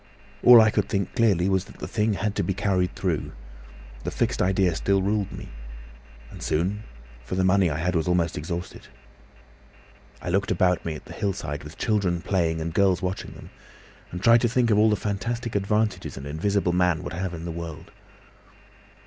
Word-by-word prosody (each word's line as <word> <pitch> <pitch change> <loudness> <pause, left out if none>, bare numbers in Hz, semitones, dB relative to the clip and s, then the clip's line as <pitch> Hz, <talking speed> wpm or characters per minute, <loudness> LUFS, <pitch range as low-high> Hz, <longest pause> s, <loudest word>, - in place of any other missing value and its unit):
"All 120 -1 +9
I 110 -1 +5
could - - 0
think 100 -2 -1
clearly 100 -7 +2
was 95 -1 +1
that - - -15
the - - -6
thing 110 -1 0
had 105 +1 -1
to 100 - -1
be 95 +2 -1
carried 95 -2 0
through; 90 -5 -2 0.7
the - - -2
fixed - - -1
idea 95 -1 +2
still 95 +4 +1
ruled 100 0 0
me. - - -9 0.8
And - - -11
soon, 95 +7 -1 0.4
for 90 - -5
the 95 - +1
money 95 -1 +3
I 75 - -2
had 90 +3 -1
was 80 -2 0
almost 90 -2 +1
exhausted. 85 +4 -6 1.3
I - - -6
looked 95 +3 0
about 90 0 +2
me 80 -2 -3
at - - -11
the - - -10
hillside, 80 -8 -3
with 75 +3 -11
children 100 -6 0
playing 85 -4 0
and 80 +1 -4
girls 95 0 +2
watching 90 +1 -4
them, - - -13 0.6
and 90 +1 -7
tried 115 0 +6
to 120 - +2
think 120 -1 +2
of 105 - +4
all 110 +1 +5
the 105 - +3
fantastic 115 +4 -3
advantages 100 -3 -1
an 65 - -7
invisible 90 +5 0
man 90 -3 +2
would - - -6
have 90 0 -3
in 80 +1 -7
the 85 - -4
world. 85 +2 -7
95 Hz, 190 wpm, -25 LUFS, 85-105 Hz, 1.3 s, All